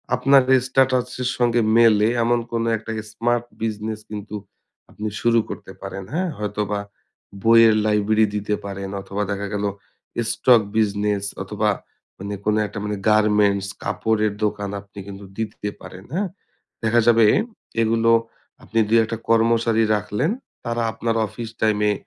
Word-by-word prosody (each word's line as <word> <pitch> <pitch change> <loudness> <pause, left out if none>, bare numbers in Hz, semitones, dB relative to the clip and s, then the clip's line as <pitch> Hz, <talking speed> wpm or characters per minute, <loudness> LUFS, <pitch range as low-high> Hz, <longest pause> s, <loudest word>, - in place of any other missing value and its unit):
আপনার 135 +1 +5 0.2
স্ট্যাটাস 130 -1 +2 0.2
এর 125 - 0
সঙ্গে 120 -1 +2 0.2
মেলে 110 -2 +5 0.2
এমন 120 +1 +2
কোনো 115 0 -1
একটা 110 +1 -7 0.2
স্মার্ট 120 +2 0 0.2
বিজনেস 110 0 -3
কিন্তু 105 0 -6 0.5
আপনি 105 - -5
শুরু 115 -1 +4
করতে - - -8
পারেন। 95 0 -6
হ্যাঁ? 180 +2 0
হয়তোবা 105 -1 -2 0.6
বইয়ের 115 -1 +6
লাইব্রেরি 110 +1 +3
দিতে 105 0 -1
পারেন। 100 -1 -5
অথবা 100 +1 -3
দেখা 100 0 -3
গেলো 105 0 0 0.6
স্টক 120 -3 +5 0.2
বিজনেস 105 -1 +1 0.2
অথবা - - -1 0.5
মানে 100 +1 -5
কোনো 105 0 +2
একটা 100 - -7
মানে 105 0 -2
গার্মেন্টস 105 -2 +3 0.2
কাপড়ের 110 -2 0
দোকান 105 -1 -2
আপনি 100 0 -13
কিন্তু 100 0 -9
দিতে 105 -2 -4
পারেন, 95 0 -10
হ্যাঁ? 195 +4 0 0.6
দেখা 115 +1 +3
যাবে 115 -1 +6 0.6
এগুলো 115 +1 +3 0.5
আপনি 115 - -1
২ 115 +1 +4
১ - - -4
টা 115 - -2
কর্মচারী 115 0 +3
রাখলেন। 105 - -1 0.3
তারা 115 0 -1
আপনার 115 0 -2
অফিস 115 +2 -7
টাইমে 105 -1 +2
110 Hz, 140 wpm, -22 LUFS, 105-115 Hz, 0.6 s, বইয়ের